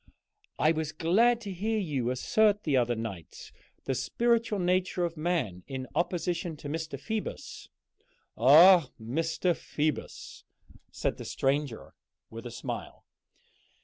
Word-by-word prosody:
"I 155 - +4
was 160 -1 -2
glad 220 +10 +3
to 200 -4 -6
hear 215 +5 -1
you 145 - -1
assert 205 - +2
the 145 - +1
other 120 -1 +2
night 100 -8 -7 0.3
the 135 - 0
spiritual 230 - +1
nature 180 0 +1
of 170 -1 -4
man 155 - -1
in 130 -2 -5
opposition 170 0 -1
to 145 - -8
Mr. 160 -2 -4
Phoebus." 220 +7 -5 0.7
"Ah, 155 - +7
Mr. 165 +9 -1
Phoebus!" 155 -1 -4 0.5
said - - -2
the - - -8
stranger, 135 -3 -2 0.4
with - - -7
a - - -6
smile. - - -7
160 Hz, 125 wpm, -29 LUFS, 135-185 Hz, 0.7 s, Ah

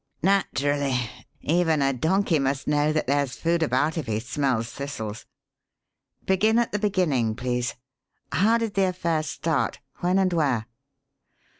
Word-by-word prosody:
"Naturally. 145 -8 +1 0.4
Even 160 -3 +2
a 135 0 +2
donkey 160 +5 +1
must 135 0 -1
know 150 0 +2
that 155 0 0
there's 140 -1 0
food 170 0 0
about 155 +2 +1
if 145 - -5
he 110 -1 0
smells 120 -1 -1
thistles. 115 -6 -6 1.0
Begin 215 +4 +3
at 235 -1 +1
the 210 - -1
beginning, 155 - +1
please. 125 0 -2 0.6
How 220 +5 +3
did 225 -3 -2
the 195 -1 +3
affair 170 -3 0
start? 155 -4 -1 0.2
When 180 +2 +2
and 190 -2 +2
where?" 135 -9 +1
150 Hz, 140 wpm, -25 LUFS, 130-180 Hz, 1.0 s, Begin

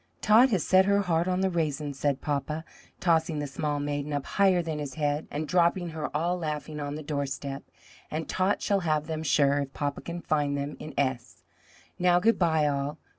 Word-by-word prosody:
"Tot 225 +5 +6
has 195 -8 +1
set 190 0 +5
her 200 0 +3
heart 170 -2 +1
on 185 0 0
the 190 - +2
raisins," 150 -4 -2
said 140 -2 0
papa, 150 +2 -2 0.3
tossing 165 -2 +2
the 145 - -2
small 145 +1 -2
maiden 145 0 -3
up 145 -1 -2
higher 190 -3 +3
than 160 -2 -3
his 145 -3 -5
head, 150 0 -1
and 150 +1 -3
dropping 175 +2 +2
her 155 -2 -4
all 175 +3 0
laughing 150 -1 -4
on 145 0 -4
the 155 - -6
door 140 -1 -2
step, 135 +1 -5 0.5
"and 155 +1 -3
Tot 190 +2 0
shall 200 -1 +2
have 155 -4 0
them 160 -1 -3
sure, 145 -2 +3
if 140 -1 -4
papa 145 -1 -3
can 170 0 -6
find 145 -3 0
them 140 +1 -4
in 155 - -8
S. 130 -3 -2 0.6
Now 175 0 +4
good 225 +5 +3
bye, 160 -4 +3
all! 145 +1 -1
155 Hz, 205 wpm, -28 LUFS, 145-175 Hz, 0.6 s, Tot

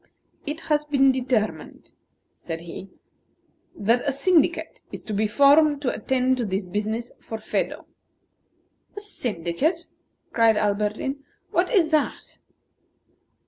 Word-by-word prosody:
"It 305 +3 -3
has 300 -1 +1
been 275 -2 +4
determined," 250 -4 -2 0.4
said 165 -1 -6
he, 175 +3 -9 0.9
"that 230 +4 +2
a - - +3
syndicate 335 +3 +1
is - - -8
to 215 - -5
be 210 +1 +1
formed 285 +5 +5
to 250 - 0
attend 255 +3 +1
to 240 - -1
this 195 0 -2
business 215 +5 -3
for 225 - -6
Phedo." 220 - -3 1.1
"A - - -2
syndicate!" 280 - -2 0.5
cried 225 -2 +4
Alberdin. 210 +6 -1 0.3
"What - - +1
is 360 -9 +3
that?" 305 -2 -1
250 Hz, 120 wpm, -24 LUFS, 210-295 Hz, 1.1 s, formed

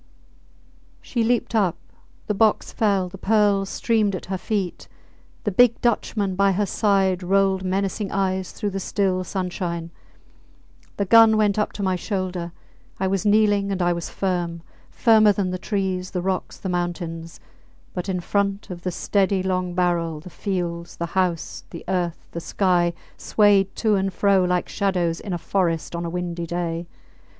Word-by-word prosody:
She 235 -3 -1
leaped 240 0 +1
up; 200 -7 +2 0.5
the 210 - -1
box 215 +1 +2
fell; 200 -4 +1
the 190 +1 -11
pearls 205 -2 +2
streamed 215 -4 +1
at 185 - -6
her - - 0
feet. 200 -5 -3 0.6
The 205 - 0
big 235 +4 +4
Dutchman 210 -4 0
by 195 0 +3
her 205 +3 +1
side 195 -2 +2
rolled 190 +1 +2
menacing 195 +2 -1
eyes 190 -1 -1
through 205 -2 -3
the 195 - -3
still 190 -1 0
sunshine. 175 -3 -3 1.1
The 200 - 0
gun 225 +2 +7
went 210 -1 +2
up 210 - 0
to 200 - -4
my 185 -1 +1
shoulder. 180 -2 -3 0.5
I 190 - 0
was 195 +2 0
kneeling 205 -1 +3
and 195 - -2
I 175 -1 +2
was 170 -1 -4
firm 175 -3 -2 0.3
firmer 215 -2 +5
than 190 -3 -1
the 185 - -3
trees, 190 -2 -2
the 180 - -3
rocks, 190 -1 -2
the - - -6
mountains. 170 -2 -3 0.5
But 180 +1 -4
in 180 -1 -1
front 200 +2 -1
of 175 -1 -7
the 180 - -2
steady 195 +1 +1
long 185 -1 -1
barrel 170 -3 0
the 175 +3 -11
fields, 170 -3 -4
the 170 - -2
house, 180 -3 -1
the 170 - -9
earth, 175 -3 -2
the 170 - -4
sky 175 -1 +1 0.2
swayed 200 -2 +3
to 220 -2 +1
and 195 -1 +1
fro 195 0 +3
like 180 0 0
shadows 180 -4 0
in 200 - -6
a 175 - -1
forest 170 -1 -1
on 170 0 -3
a - - -2
windy 175 -1 -3
day. 170 0 -3
190 Hz, 165 wpm, -23 LUFS, 175-200 Hz, 1.1 s, gun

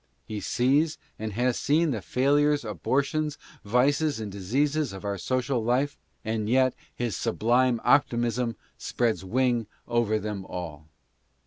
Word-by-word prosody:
He 105 -1 -5
sees 140 +9 +2 0.2
and 110 -1 -4
has 120 +3 +1
seen 155 +2 +2
the 110 -5 -2
failures, 145 +4 +2
abortions, 140 +7 -1 0.3
vices 140 +6 +2
and 105 -2 -5
diseases 135 +8 0
of 95 +1 -8
our 100 -1 -2
social 130 +2 0
life, 130 +5 +1 0.3
and 110 -1 -1
yet 130 +1 +4 0.2
his 120 -3 -2
sublime 120 +2 +2
optimism 120 -3 +2 0.2
spreads 115 -7 0
wing 120 +2 +1 0.2
over 120 -2 +1
them 105 -2 -4
all. 80 -5 -7
120 Hz, 130 wpm, -27 LUFS, 110-140 Hz, 0.3 s, yet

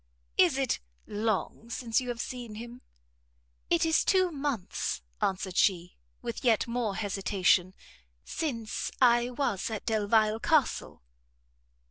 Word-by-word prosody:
"Is - - +4
it - - 0 0.3
long 215 +1 -2
since 235 0 0
you 250 - -5
have 240 -1 -3
seen 240 -4 -5
him?" 240 +3 -9 0.9
"It 170 - +3
is 320 -1 +3
two 370 -3 +3
months," 275 - -3 0.2
answered 190 -1 -1
she, 180 -2 +2 0.3
with - - -5
yet 230 -4 +3
more 235 -4 -1
hesitation, 190 -3 +1 0.5
"since 235 -9 -3
I 240 -1 +5
was 245 -7 -1
at 220 -2 -5
Delvile 215 0 +2
Castle." 290 - +1
225 Hz, 120 wpm, -29 LUFS, 205-245 Hz, 0.9 s, I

